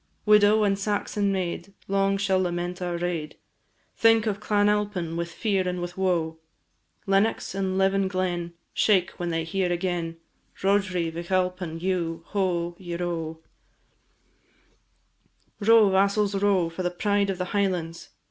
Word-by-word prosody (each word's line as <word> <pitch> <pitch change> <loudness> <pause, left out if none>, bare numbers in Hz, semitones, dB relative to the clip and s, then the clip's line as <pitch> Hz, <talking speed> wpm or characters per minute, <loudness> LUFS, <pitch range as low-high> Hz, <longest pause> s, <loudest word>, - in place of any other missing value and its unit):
Widow 210 0 +5
and 200 -1 +1
Saxon 205 0 -1
maid 190 +1 -3
Long 195 0 +1
shall 195 -1 +1
lament 175 0 -3
our 175 -1 -2
raid, 170 -3 -3 0.6
Think 225 -1 +4
of 205 -2 -1
Clan 205 -1 +2
Alpine 205 -5 0
with 170 0 -3
fear 195 -3 0
and 180 0 -2
with 175 0 -5
woe; 170 -4 0 0.7
Lennox 195 +2 +1
and 190 -1 -1
Leven 195 0 +2
Glen 180 -2 -2 0.2
Shake 190 -4 +3
when 175 -1 -2
they 165 -1 -1
hear 180 +2 -1
agen, 175 -2 -2 0.5
Roderigh 190 -4 +1
Vich 170 +1 -7
Alpine 180 -3 -1
dhu, 165 -2 -2
ho! 175 -4 -1
ieroe! 170 -3 -4 2.2
Row, 220 0 +6
vassals, 200 +2 +2
row, 195 -3 +2
for 165 +3 -6
the 180 - 0
pride 200 +2 0
of 190 - -2
the 180 - -2
Highlands! 180 -5 -1
185 Hz, 140 wpm, -26 LUFS, 175-200 Hz, 2.2 s, Row